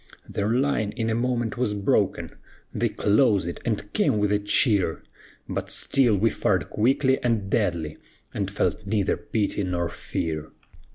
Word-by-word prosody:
Their 100 +1 -2
line 125 -3 +1
in 115 -2 -1
a - - +1
moment 120 -1 -1
was 105 -4 0
broken; 100 -1 +1 0.4
They - - 0
closed 105 -3 +2
it, 85 - -5
and - - -2
came - - +2
with 105 -1 +1
a 105 - +3
cheer; 100 - +1 0.4
But - - -4
still 120 -6 +2
we 110 +3 +2
fired - - 0
quickly 130 +4 +2
and 110 -5 0
deadly, 85 -9 0 0.4
And 100 -2 -2
felt 100 +1 -1
neither 105 -1 +1
pity 105 -2 -2
nor 90 -2 -1
fear. 80 -2 -4
105 Hz, 155 wpm, -25 LUFS, 95-115 Hz, 0.4 s, a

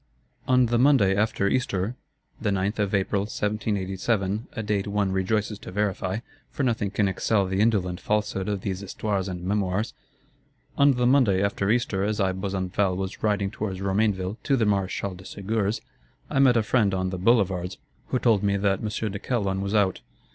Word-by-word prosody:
"On 125 -1 +5
the 120 0 +1
Monday 125 -8 +5
after 105 -1 +1
Easter," 105 -2 0 0.5
the 110 - 0
9th 100 +2 -1
of 100 -1 +1
April 100 +1 +1
1787, 105 0 -1
a 115 - -4
date 105 -1 -1
one 100 -1 0
rejoices 105 +2 -1
to - - -9
verify, 95 -1 -1 0.3
for - - -3
nothing 115 -5 0
can 100 0 +1
excel 100 +2 +1
the 95 +1 0
indolent 95 -6 +1
falsehood 105 -2 -1
of 100 -2 -2
these 95 -2 -3
Histoires 100 0 -2
and 90 -2 -5
Mémoires,—"On 105 +7 -2
the 125 0 +1
Monday 120 -8 +4
after 100 0 0
Easter, 110 -4 +1
as 105 +1 -1
I, 95 -2 +2
Besenval, 95 0 -1
was 95 0 -4
riding 100 -2 +1
towards 95 -3 -4
Romainville 100 0 0
to 135 - +1
the 115 - +2
Maréchal 100 -1 -1
de 95 - -12
Segur's, 100 +2 -2 0.5
I - - +1
met 130 -3 +5
a 115 - +3
friend 105 -4 +2
on 95 0 -1
the 95 - -4
Boulevards, 95 -4 +2 0.3
who - - 0
told 115 -5 +3
me 100 -1 +1
that 100 -1 +1
M. 110 - -3 0.2
de 100 - -5
Calonne 100 -5 -1
was 100 +2 -2
out. 100 -3 +2
100 Hz, 175 wpm, -25 LUFS, 95-110 Hz, 0.5 s, On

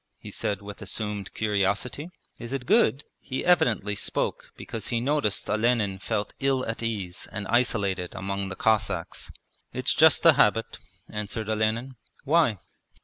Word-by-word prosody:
he - - -10
said 100 0 -2
with 100 0 -9
assumed 105 0 -3
curiosity. 105 - 0 0.3
'Is 120 +2 -6
it 135 -2 -3
good?' 190 - +3 0.2
He 130 - -4
evidently 125 - +3
spoke 100 - -2
because 110 -2 -6
he 120 - 0
noticed 135 -4 0
Olenin 110 -3 +1
felt 105 0 -2
ill 135 -1 +1
at 115 +1 -4
ease 100 -6 -3
and 100 -1 -5
isolated 100 -7 +1
among 100 0 -3
the 95 - -5
Cossacks. 100 -6 0 0.4
'It's 130 +1 0
just 160 +1 +5
a 165 - +9
habit,' 115 -3 +2 0.3
answered 105 0 -4
Olenin. 110 +4 -1 0.3
'Why?' 150 -7 +3
110 Hz, 145 wpm, -26 LUFS, 100-130 Hz, 0.4 s, a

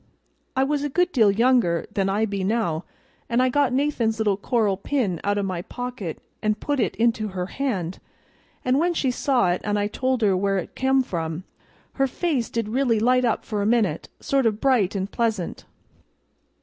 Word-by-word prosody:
I 265 - +3
was 290 +1 0
a 290 - -1
good 360 +5 +1
deal 225 - +4
younger 215 -5 +3
then 195 -1 +1
than - - 0
I 220 +2 +2
be 200 -3 -3
now, 190 -6 0 0.4
and 235 +1 +2
I 255 0 +4
got 280 0 +2
Nathan's 255 -5 +1
little 210 -3 +2
coral 210 0 +1
pin 200 - -1
out 205 +1 +1
o' 200 - 0
my 185 -3 -2
pocket 245 -5 -5 0.2
and 215 0 0
put 290 -2 -1
it 230 - 0
into 225 -2 +1
her 185 -2 -3
hand; 190 -7 -3 0.7
and 255 +2 +3
when 345 +1 +1
she 265 -4 +1
saw 245 -7 +2
it 175 - -1
and 210 0 0
I 205 - +1
told 255 +3 -1
her 200 -3 +4
where 195 +1 +1
it 185 - -5
come 265 0 +2
from, 165 -4 -4 0.6
her 270 - +4
face 270 -3 -1
did 230 -2 -2
really 240 -2 +2
light 250 +3 +3
up 230 - 0
for 210 -2 -2
a 200 - +1
minute, 215 -9 +1
sort 270 -3 +1
of 215 -1 -1
bright 235 -8 +2
an' 190 -1 0
pleasant. 215 -3 -2
225 Hz, 200 wpm, -24 LUFS, 195-260 Hz, 0.7 s, deal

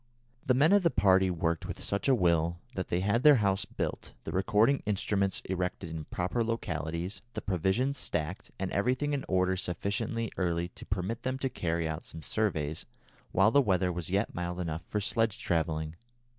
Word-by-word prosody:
The 130 - +2
men 150 +8 +5
of 205 - +6
the 170 - +4
party 95 - +4
worked 85 -2 -1
with - - -6
such 100 +5 -1
a 135 - +5
will 85 -4 +2 0.2
that 95 - -3
they 85 - 0
had 105 +5 +2
their 150 +1 +8
house 100 -5 +1
built, - - -4
the - - -5
recording 105 +8 +3
instruments 100 -1 +1
erected 90 -2 -3
in 80 -2 -5
proper 90 +10 -1
localities, 85 -5 -3
the - - -3
provisions 100 - 0
stacked, 85 +2 -3
and 95 -1 -3
everything 130 +8 +1
in 140 - -1
order 95 0 +2
sufficiently 100 +5 -2
early 85 -2 0
to - - -11
permit 100 +4 -2
them 130 +1 -2
to 135 0 -1
carry 85 -6 -1
out 80 +1 -4
some 80 - -8
surveys 80 -9 -1 0.4
while 95 +4 +4
the 140 - +6
weather 95 -6 +2
was 85 -1 -4
yet 100 +4 0
mild 90 0 -3
enough 80 -2 -3
for 105 - 0
sledge 115 +1 0
travelling. 80 -1 -1
95 Hz, 185 wpm, -30 LUFS, 85-115 Hz, 0.4 s, their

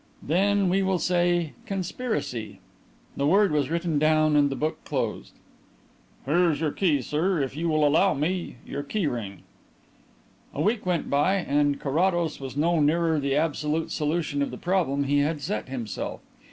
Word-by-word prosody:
"Then 195 +5 +2
we 190 +2 +2
will 190 -1 +1
say 175 -2 +1
'Conspiracy.'" 185 - -3 0.6
The 140 - 0
word 195 +3 +4
was 150 -2 +1
written 165 -2 0
down 155 0 +3
and 145 -1 +4
the 135 - -3
book 155 +3 -3
closed. - - -3 0.9
"Here 170 +5 +3
is 150 -3 -1
your 155 -2 0
key, 150 -8 +1
sir. 165 +7 0
If 135 -1 -2
you 165 +2 -1
will 155 -1 +3
allow 160 +5 +3
me 170 +5 -2
your 140 - -4
key 175 +7 -2
ring 115 -8 -4 0.5
" - - -33
A 145 - -2
week 210 0 0
went 175 -3 0
by 145 +7 +3
and 145 -5 +1
Carrados 170 +2 0
was 135 0 -7
no 165 +2 +2
nearer 160 +1 +2
the 140 -1 0
absolute 155 +1 -1
solution 150 -1 -1
of 140 - 0
the - - -7
problem 170 -7 0
he 145 +1 +2
had 150 +2 0
set 150 -1 -4
himself. 120 -5 -5
155 Hz, 170 wpm, -26 LUFS, 145-175 Hz, 0.9 s, word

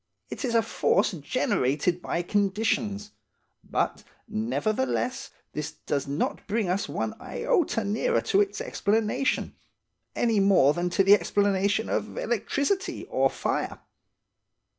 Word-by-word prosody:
It - - -5
is 240 -3 0
a 225 - +4
force 200 - +2
generated 150 +1 0
by 175 - -2
conditions; 205 +1 0 0.5
but, - - -1 0.2
nevertheless, 235 +4 -1 0.2
this 150 -1 -4
does 140 -2 -3
not 140 +3 -2
bring 210 -1 0
us 190 +3 -1
one - - -2
iota 340 - 0
nearer 220 - +1
to 400 - +3
its 405 - -1
explanation, 225 +7 0 0.6
any 230 -3 +2
more 195 -8 +5
than 175 +2 -1
to 195 +2 +2
the 195 +1 +7
explanation 200 +2 +2
of 215 - -2
electricity 275 - -1
or - - +3
fire. - - -2
210 Hz, 120 wpm, -27 LUFS, 185-230 Hz, 0.6 s, the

